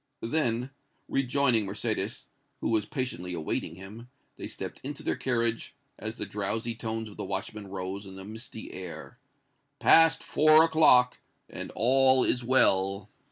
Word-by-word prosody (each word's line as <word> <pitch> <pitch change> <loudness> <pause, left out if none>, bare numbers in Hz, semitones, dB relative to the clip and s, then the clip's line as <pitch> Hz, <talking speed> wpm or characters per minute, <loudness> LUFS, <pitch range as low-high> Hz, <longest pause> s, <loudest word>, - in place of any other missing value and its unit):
Then, 125 -1 -1 0.4
rejoining 125 -5 +1
Mercédès, 105 +2 -3 0.3
who - - -2
was 110 -2 +1
patiently 105 - -4
awaiting 80 0 -3
him, 105 +6 -11 0.3
they - - -7
stepped - - -8
into 140 +1 -6
their - - -1
carriage, 115 0 -2 0.2
as 110 +1 -5
the - - -4
drowsy 110 +3 -3
tones 110 -1 -4
of 105 - -13
the - - -4
watchman 100 +1 -5
rose 95 +1 -6
on 95 - -11
the 95 0 -10
misty 110 +1 -9
air, 90 -2 -9 0.6
"Past 165 0 +5
four 155 +1 +5
o'clock, 150 -6 +4 0.3
and - - -7
all 130 +2 +4
is 125 - 0
well!" 100 -6 +3
115 Hz, 145 wpm, -28 LUFS, 100-130 Hz, 0.6 s, Past